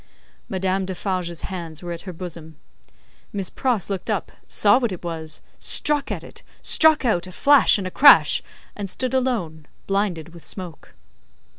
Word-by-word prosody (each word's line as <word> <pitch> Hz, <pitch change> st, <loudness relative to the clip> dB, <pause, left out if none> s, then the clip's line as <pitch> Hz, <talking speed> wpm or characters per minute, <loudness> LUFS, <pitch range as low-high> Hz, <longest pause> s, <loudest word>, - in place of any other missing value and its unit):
Madame 190 Hz, 0 st, -1 dB
Defarge's 185 Hz, -2 st, -3 dB
hands 170 Hz, -4 st, -7 dB
were 175 Hz, -, -5 dB
at 170 Hz, -, -6 dB
her -, -, -4 dB
bosom. 165 Hz, -2 st, -9 dB, 0.8 s
Miss 195 Hz, -2 st, -3 dB
Pross 245 Hz, -8 st, -1 dB
looked 195 Hz, +1 st, -4 dB
up, 215 Hz, -, -2 dB, 0.2 s
saw 205 Hz, +4 st, +4 dB
what 240 Hz, -5 st, -1 dB
it 180 Hz, -, -7 dB
was, 160 Hz, -2 st, -5 dB, 0.2 s
struck 295 Hz, -1 st, +2 dB
at -, -, -4 dB
it, -, -, -12 dB, 0.2 s
struck 315 Hz, -3 st, +4 dB
out 185 Hz, -6 st, +1 dB
a -, -, -9 dB
flash 280 Hz, +6 st, +5 dB
and 195 Hz, -, -4 dB
a 185 Hz, -, -4 dB
crash, 285 Hz, +7 st, +7 dB, 0.3 s
and 200 Hz, -2 st, -5 dB
stood 255 Hz, +6 st, -3 dB
alone 215 Hz, -, -1 dB, 0.2 s
blinded 195 Hz, -5 st, -1 dB
with 170 Hz, -, -13 dB
smoke. 175 Hz, -, -8 dB
185 Hz, 160 wpm, -22 LUFS, 170-220 Hz, 0.8 s, crash